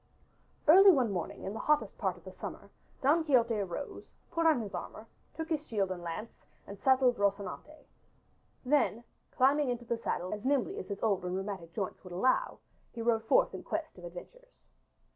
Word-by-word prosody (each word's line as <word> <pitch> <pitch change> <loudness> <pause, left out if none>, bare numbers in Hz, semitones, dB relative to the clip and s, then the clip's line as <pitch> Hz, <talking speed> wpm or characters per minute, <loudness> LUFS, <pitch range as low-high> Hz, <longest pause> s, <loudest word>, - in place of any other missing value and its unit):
Early 385 +6 +9
one 260 - +4
morning 175 -4 -4
in 195 - -4
the 225 - -5
hottest 300 0 +1
part - - -1
of - - -18
the - - -9
summer - - -8 0.3
Don 310 +5 +4
Quixote 245 -6 +3
arose, 195 +7 -5 0.2
put 330 0 +2
on 315 -6 +4
his 210 -4 -6
armor, 215 - -6 0.3
took 320 0 -4
his 310 -3 -1
shield 200 -4 0
and 180 -1 -5
lance 175 +7 -5 0.3
and 200 -1 -10
saddled 260 -2 +4
Rocinante. 200 +9 -2 0.8
Then, 250 -4 +2 0.3
climbing 275 +2 +3
into 240 -1 -3
the 235 0 -1
saddle 180 -5 -2
as 210 0 -6
nimbly 285 - 0
as - - -7
his 200 0 -5
old 200 -5 +1
and 180 0 -2
rheumatic 190 -3 -5
joints 195 -4 -4
would 180 -2 -9
allow, 255 - +1 0.4
he 230 - -5
rode 225 -1 +1
forth - - +3
in - - -6
quest 320 0 -4
of - - -13
adventures. - - -12
235 Hz, 185 wpm, -31 LUFS, 195-295 Hz, 0.8 s, Early